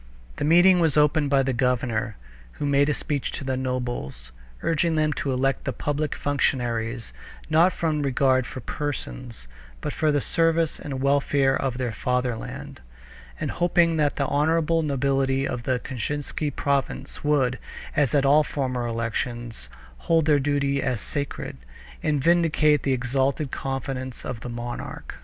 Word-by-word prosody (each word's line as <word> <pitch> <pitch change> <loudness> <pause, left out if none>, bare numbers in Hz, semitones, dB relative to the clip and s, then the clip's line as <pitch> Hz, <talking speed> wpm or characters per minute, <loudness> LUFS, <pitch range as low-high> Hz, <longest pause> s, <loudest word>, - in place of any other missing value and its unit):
The - - -2
meeting 175 +3 +6
was 160 -4 +2
opened 150 0 +3
by 140 -1 +4
the 135 0 0
governor, 120 -3 0 0.4
who - - -4
made 140 0 +3
a - - +3
speech 145 -3 -2
to - - -5
the 130 -1 -1
nobles, 120 - -3 0.3
urging 165 0 +1
them 155 -1 +2
to 140 - -2
elect 135 +1 0
the - - -1
public 150 +1 -2
functionaries, 120 - -1 0.4
not 165 +4 +5
from 160 -3 -1
regard 130 -2 +2
for 130 - -7
persons, 65 - -5 0.3
but - - -4
for 155 -1 +2
the 145 - +2
service 165 +2 +1
and 135 -2 -5
welfare 140 -1 +3
of 130 -3 -1
their 125 -2 -1
fatherland, 125 +4 -3 0.6
and - - -2
hoping 170 -1 +2
that 150 -2 +2
the 140 - 0
honorable 165 +3 +2
nobility 135 -2 +1
of 120 -2 -4
the 130 -1 +1
Kashinsky 145 +4 -3
province 140 -1 -2
would, 135 -4 +2 0.4
as 145 -2 +2
at 140 -1 +3
all 145 +3 +6
former 130 -5 -2
elections, 115 - -3 0.3
hold 165 - +2
their 150 -2 +4
duty 140 0 +1
as 125 -4 -1
sacred, 140 - -4 0.4
and 145 -3 0
vindicate 160 -3 +4
the 135 - 0
exalted 130 +3 0
confidence 135 -1 -4
of 120 - -4
the 125 - -7
monarch. 120 0 -6
140 Hz, 150 wpm, -25 LUFS, 125-150 Hz, 0.6 s, meeting